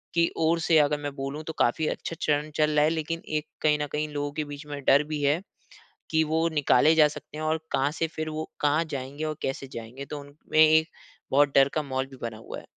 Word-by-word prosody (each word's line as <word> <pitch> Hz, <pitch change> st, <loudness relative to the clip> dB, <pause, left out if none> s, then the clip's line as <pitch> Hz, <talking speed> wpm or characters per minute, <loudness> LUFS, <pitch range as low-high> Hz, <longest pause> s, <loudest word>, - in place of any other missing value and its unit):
की 170 Hz, 0 st, +4 dB
ओर 165 Hz, +1 st, +2 dB
से 160 Hz, 0 st, +3 dB
अगर 150 Hz, 0 st, +3 dB
मैं 145 Hz, -1 st, -3 dB
बोलूँ, 135 Hz, +3 st, -5 dB
तो 160 Hz, -, -6 dB
काफ़ी 155 Hz, +6 st, +2 dB
अच्छा 165 Hz, -, -4 dB
चरण 150 Hz, 0 st, +1 dB
चल 150 Hz, 0 st, +2 dB
रहा 150 Hz, 0 st, +4 dB
है। -, -, +3 dB
लेकिन 165 Hz, +1 st, -3 dB
एक 155 Hz, 0 st, -2 dB
कहीं 150 Hz, -1 st, +3 dB
न 150 Hz, -, -1 dB
कहीं 150 Hz, +1 st, -1 dB
लोगों 145 Hz, 0 st, -2 dB
के -, -, +1 dB
बीच 145 Hz, +1 st, -8 dB
में 145 Hz, -1 st, -5 dB
डर 140 Hz, +2 st, +6 dB
भी 150 Hz, -1 st, -2 dB
है 145 Hz, +5 st, +2 dB, 0.7 s
कि 160 Hz, 0 st, +3 dB
वो 160 Hz, +2 st, +1 dB
निकाले 150 Hz, +1 st, +4 dB
जा 155 Hz, -2 st, +6 dB
सकते 150 Hz, -, -10 dB
हैं 155 Hz, -, -3 dB
और 160 Hz, +1 st, 0 dB
कहाँ 140 Hz, +1 st, +2 dB
से 165 Hz, -, +3 dB
फिर 155 Hz, 0 st, -2 dB
वो 155 Hz, +1 st, -5 dB
कहाँ 150 Hz, +3 st, +2 dB
जाएँगे 135 Hz, +4 st, -5 dB
और 155 Hz, -1 st, -3 dB
कैसे 135 Hz, 0 st, -3 dB
जाएँगे। 115 Hz, +4 st, -7 dB
तो 145 Hz, 0 st, -6 dB
उनमें 145 Hz, +2 st, -5 dB
एक 160 Hz, +1 st, +4 dB, 0.4 s
बहुत 145 Hz, 0 st, +4 dB
डर 135 Hz, 0 st, +7 dB
का 155 Hz, -, +1 dB
माहौल 130 Hz, -1 st, -2 dB
भी 135 Hz, 0 st, -13 dB
बना 115 Hz, -2 st, -4 dB
हुआ 110 Hz, -, -8 dB
है। -, -, -16 dB
150 Hz, 245 wpm, -27 LUFS, 140-155 Hz, 0.7 s, डर